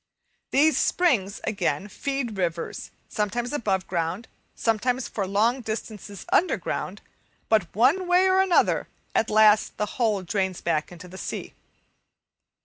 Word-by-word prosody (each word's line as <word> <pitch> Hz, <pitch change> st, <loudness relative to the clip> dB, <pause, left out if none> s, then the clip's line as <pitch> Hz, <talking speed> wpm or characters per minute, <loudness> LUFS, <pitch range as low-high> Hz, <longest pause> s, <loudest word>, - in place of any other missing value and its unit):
These 305 Hz, +3 st, +4 dB
springs, 220 Hz, -, +1 dB
again, 190 Hz, -4 st, -1 dB
feed 270 Hz, +1 st, -3 dB
rivers, 170 Hz, -3 st, -3 dB, 0.2 s
sometimes 235 Hz, +5 st, -2 dB
above 195 Hz, -9 st, 0 dB
ground, 175 Hz, +5 st, -2 dB, 0.3 s
sometimes 245 Hz, +3 st, 0 dB
for 200 Hz, -3 st, -3 dB
long 225 Hz, +6 st, +2 dB
distances 215 Hz, -3 st, -6 dB
under 365 Hz, -, +3 dB
ground; -, -, -4 dB, 0.5 s
but 215 Hz, -6 st, +3 dB
one 285 Hz, -, +3 dB
way 360 Hz, +1 st, +4 dB
or 375 Hz, 0 st, +4 dB
another 380 Hz, -2 st, +3 dB, 0.3 s
at 220 Hz, -, +1 dB
last 215 Hz, 0 st, +4 dB
the 210 Hz, -, 0 dB, 0.2 s
whole 210 Hz, -5 st, +2 dB
drains 190 Hz, 0 st, -1 dB
back 160 Hz, -2 st, -1 dB
into 175 Hz, +1 st, -11 dB
the 190 Hz, +2 st, -10 dB
sea. -, -, -5 dB
215 Hz, 135 wpm, -25 LUFS, 190-250 Hz, 0.5 s, These